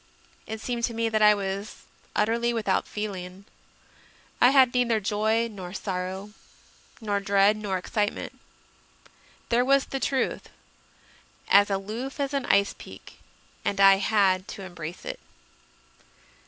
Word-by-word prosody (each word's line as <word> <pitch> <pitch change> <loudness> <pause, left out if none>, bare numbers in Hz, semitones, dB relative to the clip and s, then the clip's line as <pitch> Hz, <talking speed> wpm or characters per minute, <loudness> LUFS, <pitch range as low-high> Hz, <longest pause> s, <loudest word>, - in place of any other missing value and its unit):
It 220 0 -5
seemed 235 +1 -4
to 235 - -5
me 230 0 0
that 215 -1 0
I 210 0 +7
was 200 +1 -5 0.3
utterly 235 +3 +1
without 215 -5 0
feeling; 195 -2 -6 1.0
I 245 - +8
had 265 -2 +5
neither 240 -3 +2
joy 215 +3 0
nor 185 -5 -9
sorrow, 190 +1 -4 0.7
nor 205 -3 -1
dread 200 +1 +3
nor 205 -3 -3
excite 205 +3 -1
ment. - - -9 1.1
There 240 +1 +3
was 275 +1 +3
the 270 - -4
Truth, 265 -1 -1 1.0
as 205 +1 +6
aloof 215 +8 -4
as 280 0 -2
an 275 -2 -2
ice 200 0 +3
peak, - - -13 0.4
and 200 - -2
I 195 0 +7
had 195 -2 +2
to 195 - -8
embrace 175 -2 -8
it. - - -5
210 Hz, 135 wpm, -26 LUFS, 195-235 Hz, 1.1 s, I